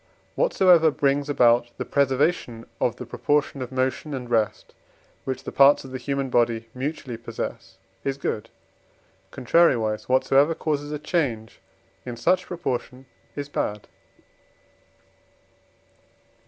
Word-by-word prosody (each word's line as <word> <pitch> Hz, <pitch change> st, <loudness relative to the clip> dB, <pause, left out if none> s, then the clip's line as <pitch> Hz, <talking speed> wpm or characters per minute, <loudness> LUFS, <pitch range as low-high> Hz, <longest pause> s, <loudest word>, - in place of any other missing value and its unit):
Whatsoever 180 Hz, -, +4 dB
brings 140 Hz, 0 st, 0 dB
about 120 Hz, -3 st, +4 dB
the -, -, -4 dB
preservation 135 Hz, -3 st, 0 dB
of -, -, +1 dB
the -, -, -8 dB
proportion 145 Hz, -2 st, -1 dB
of 125 Hz, -, -5 dB
motion 130 Hz, +3 st, -1 dB
and 125 Hz, -2 st, -6 dB
rest, 115 Hz, -3 st, -1 dB, 0.5 s
which 130 Hz, -1 st, -4 dB
the -, -, -6 dB
parts 140 Hz, +1 st, +5 dB
of 130 Hz, -, -10 dB
the 130 Hz, -, -5 dB
human 135 Hz, 0 st, -2 dB
body 115 Hz, -1 st, +1 dB
mutually 130 Hz, -2 st, -4 dB
possess, 115 Hz, 0 st, -7 dB, 0.3 s
is 135 Hz, 0 st, -2 dB
good; 115 Hz, -5 st, -3 dB, 0.8 s
contrariwise, 120 Hz, -8 st, +2 dB
whatsoever 135 Hz, +4 st, +3 dB
causes 145 Hz, -2 st, -2 dB
a 150 Hz, -, -2 dB
change 140 Hz, -, -2 dB, 0.4 s
in 120 Hz, -2 st, -6 dB
such 185 Hz, +9 st, +1 dB
proportion 130 Hz, -6 st, -4 dB, 0.3 s
is 145 Hz, -1 st, -4 dB
bad. 105 Hz, -7 st, -3 dB
135 Hz, 120 wpm, -24 LUFS, 120-145 Hz, 0.8 s, parts